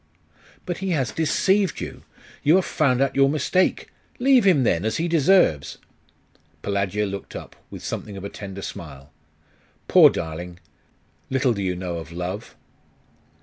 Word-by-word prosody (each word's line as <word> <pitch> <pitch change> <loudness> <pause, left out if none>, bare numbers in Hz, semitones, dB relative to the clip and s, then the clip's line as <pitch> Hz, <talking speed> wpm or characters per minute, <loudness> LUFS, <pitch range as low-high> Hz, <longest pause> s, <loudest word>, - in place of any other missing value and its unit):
'But 175 - -4
he 190 +1 -3
has 130 -5 -1
deceived 190 +4 +1
you! - - -7 0.4
You 150 +4 +4
have 190 - +3
found 130 -4 +1
out 135 - -2
your 135 0 +4
mistake. 155 +6 +1 0.3
Leave 255 -3 +4
him, 170 -9 +5
then, 85 -6 +1
as 110 - -1
he 165 - 0
deserves!' 165 - +3 0.9
Pelagia 100 +1 -1
looked 100 -1 -7
up, - - -9
with - - -9
something 100 -2 -5
of 95 - -8
a - - -3
tender 100 -1 -8
smile. 70 -3 -9 0.8
'Poor - - +8
darling! 85 +2 -6 0.7
Little 130 -2 +2
do 100 - -4
you 90 -2 -1
know 90 -1 -4
of 80 0 -8
love! 90 +5 -5
110 Hz, 150 wpm, -23 LUFS, -, 0.9 s, Poor